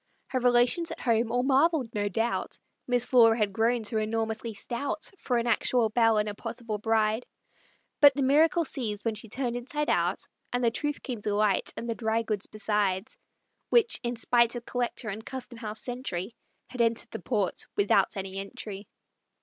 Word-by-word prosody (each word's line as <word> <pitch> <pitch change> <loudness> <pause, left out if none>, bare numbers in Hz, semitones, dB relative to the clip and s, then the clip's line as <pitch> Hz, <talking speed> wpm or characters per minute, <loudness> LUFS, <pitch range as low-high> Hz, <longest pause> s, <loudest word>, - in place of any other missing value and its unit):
Her 255 - 0
relations 245 +7 +3
at - - -6
home 230 -1 +1
all 245 +1 +1
marveled, 275 -2 +2
no 205 -1 -1
doubt, 225 +4 -2 0.3
Miss 245 -1 +2
Flora 230 -3 +5
had 210 -3 0
grown 230 +2 +1
so 220 +1 0
enormously 220 +1 -2
stout 260 +8 -3
For 245 - 0
an 235 - 0
actual 235 0 +2
belle 225 0 +3
and 210 0 +1
a 210 - -3
possible 230 0 -5
bride; 220 +1 +1 0.8
But 285 -2 +8
the 280 - 0
miracle 320 +5 +4
ceased 215 -7 -2
when 225 - +1
she 215 +1 -10
turned 245 +1 -2
inside 295 +5 -3
out, - - 0 0.2
And 245 0 -1
the 230 - +3
truth 295 +4 -2
came 240 -5 -4
to 205 0 -1
light, 210 -2 +1
and 235 - -5
the 230 - 0
dry 225 0 0
goods 215 -3 -3
besides, 210 -2 -1 0.5
Which, 470 -1 +3
in 240 -1 -2
spite 235 +1 +2
of 240 0 -6
Collector 245 -2 -2
and 215 +2 -5
Custom 250 -2 -7
House 215 -1 -5
sentry, 240 -5 -4 0.4
Had 250 - -3
entered 230 0 0
the - - -6
port 205 -7 -1
without 200 -1 +2
any 195 0 -5
entry. 195 +1 -7
230 Hz, 180 wpm, -28 LUFS, 215-245 Hz, 0.8 s, But